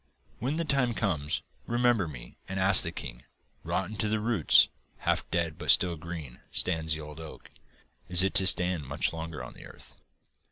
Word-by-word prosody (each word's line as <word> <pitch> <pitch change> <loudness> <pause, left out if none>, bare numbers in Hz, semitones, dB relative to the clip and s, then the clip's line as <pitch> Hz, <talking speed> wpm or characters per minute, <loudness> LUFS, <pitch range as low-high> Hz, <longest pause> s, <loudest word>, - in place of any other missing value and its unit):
'When 130 +6 -2
the 165 +1 -2
time 130 -5 0
comes, 85 -3 -2 0.2
remember 120 -5 +2
me 70 -6 -10
and 95 0 -3
ask 95 +1 +6
the - - -1
king: - - -9 0.4
"Rotten 95 +3 -3
to 105 - 0
the 110 +1 0
roots, 115 0 +4 0.3
half - - -1
dead 85 -2 -2
but - - -6
still 90 -2 +5
green, 80 -5 -8
stands 80 -3 +1
the 80 - -7
old 75 0 -10
oak. 80 -1 -11 0.6
Is 90 0 +6
it 95 - 0
to 95 -2 +5
stand 90 -6 +3
much 70 +4 0
longer 80 -1 -6
on - - -10
the - - -13
earth?" - - -13
90 Hz, 185 wpm, -28 LUFS, 80-105 Hz, 0.6 s, ask